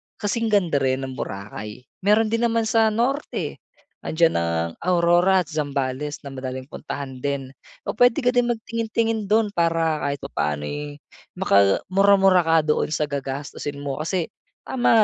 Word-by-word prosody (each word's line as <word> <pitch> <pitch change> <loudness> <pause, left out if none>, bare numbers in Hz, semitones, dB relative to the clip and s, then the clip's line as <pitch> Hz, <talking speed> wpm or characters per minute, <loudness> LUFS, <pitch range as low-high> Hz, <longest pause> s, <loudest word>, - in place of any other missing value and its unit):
kasing 225 +2 -1
ganda 180 -9 +2
rin 130 0 0
ng 130 - -4
Boracay. 105 +4 -6 0.2
Meron 215 +3 +3
din 230 +1 +2
naman 230 0 +1
sa 220 0 +3
norte. 245 +7 -1 0.4
Andiyan 165 +1 +2
ang 85 0 -1
Aurora 180 +1 +3
at 150 - -14
Zambales 145 -1 -3
na 140 - -6
madaling 130 0 -5
puntahan 140 -2 -7
din. 140 -1 -3 0.3
O - - -2
pwede 245 +3 +4
ka 245 0 +3
din 245 -1 +2
magtingin-tingin 225 -1 -1
dun 215 0 +3
para 165 -3 +1
kahit 140 0 -1
papano'y 145 - -3 0.4
makamura-mura 190 - +4
ka 165 -1 +2
doon 150 0 +1
sa 150 0 0
gagastusin 140 0 -5
mo. 140 0 -4
Kasi 170 +1 -1 0.4
tama 240 -3 +3
165 Hz, 145 wpm, -23 LUFS, 135-215 Hz, 0.4 s, pwede